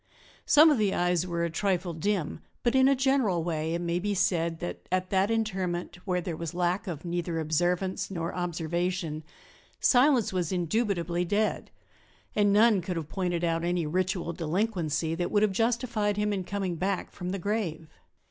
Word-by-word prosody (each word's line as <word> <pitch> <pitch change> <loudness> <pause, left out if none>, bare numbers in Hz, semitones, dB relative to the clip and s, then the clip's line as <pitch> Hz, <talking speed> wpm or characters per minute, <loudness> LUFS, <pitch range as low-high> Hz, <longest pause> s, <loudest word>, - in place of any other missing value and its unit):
Some 305 +2 +7
of 280 - +2
the 205 -2 +1
eyes 175 0 +1
were 170 -1 -1
a 170 - -3
trifle 180 0 -1
dim, 175 0 -1 0.2
but 240 - +2
in 265 0 +5
a 275 - +4
general 260 -10 +2
way 160 -1 -1
it 170 - -2
may 170 0 -1
be 205 +2 -1
said 170 -3 +1
that 175 - -6
at 185 0 0
that 195 +1 +2
interment 185 -6 -2 0.2
there 170 -2 -3
was 165 0 -5
lack 180 +4 0
of 165 -2 -5
neither 170 -1 -2
observance 175 +4 0
nor 170 -3 -3
observation; 175 -1 -2 0.6
Silas 250 -5 +4
was 180 -4 -1
indubitably 175 -2 0
dead, 205 +4 0 0.7
and 205 -1 +3
none 210 -1 +5
could 180 +1 -4
have 160 -2 -4
pointed 175 -2 -2
out 165 -1 0
any 175 -1 0
ritual 180 +1 -1
delinquency 165 -2 -1
that 175 +1 -2
would 205 0 +2
have 215 - +3
justified 225 -1 0
him 210 0 +1
in 190 -2 -3
coming 190 -3 -3
back 190 +2 -2
from 180 - -6
the 195 - -2
grave. 180 -5 -2
180 Hz, 175 wpm, -28 LUFS, 170-205 Hz, 0.7 s, Some